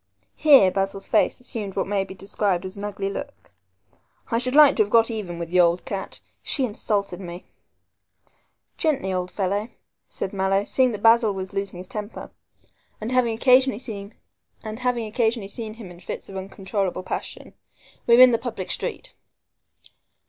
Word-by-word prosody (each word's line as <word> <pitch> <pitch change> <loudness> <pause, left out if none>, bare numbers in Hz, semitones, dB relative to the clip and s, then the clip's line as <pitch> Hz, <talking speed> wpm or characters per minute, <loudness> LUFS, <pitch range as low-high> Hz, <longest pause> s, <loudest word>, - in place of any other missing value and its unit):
Here 275 -11 +6
Basil's 195 +1 -2
face - - +2
assumed 215 -6 -6
what 195 - 0
may 195 0 0
be 190 0 -10
described 195 -1 -1
as 185 +2 -6
an 200 - -8
ugly 200 -1 -3
look. 280 +8 -7 0.8
"I 230 - +2
should 255 +2 -2
like 295 -2 +8
to - - +4
have 205 - +1
got 230 +1 +4
even 195 -6 -5
with 170 0 -6
the 180 - +3
old 175 0 +3
cat. 195 -1 -5 0.2
She 270 - 0
insulted 200 -4 -2
me." 175 -1 -8 1.3
"Gently, 275 - 0
old 180 0 -2
fellow," 200 +4 -2 0.4
said 190 - -5
Mallow, 195 0 +1
seeing 255 +3 +2
that 205 - -6
Basil 225 -1 +5
was 190 +1 -6
losing 195 -2 -3
his 180 +1 -8
temper, 210 +2 -7 0.7
and 220 +3 -4
having 245 -3 +2
occasionally 255 0 +4
seen 210 -4 -7 0.5
him 225 -2 -2
in 175 - -13
fits 175 - -7
of 195 - -9
uncontrollable 190 0 -3
passion, 185 - -6 0.5
"we're 235 +1 +7
in 255 -1 +9
the 230 - +1
public 220 -7 -5
street." - - -3
205 Hz, 155 wpm, -24 LUFS, 190-235 Hz, 1.3 s, in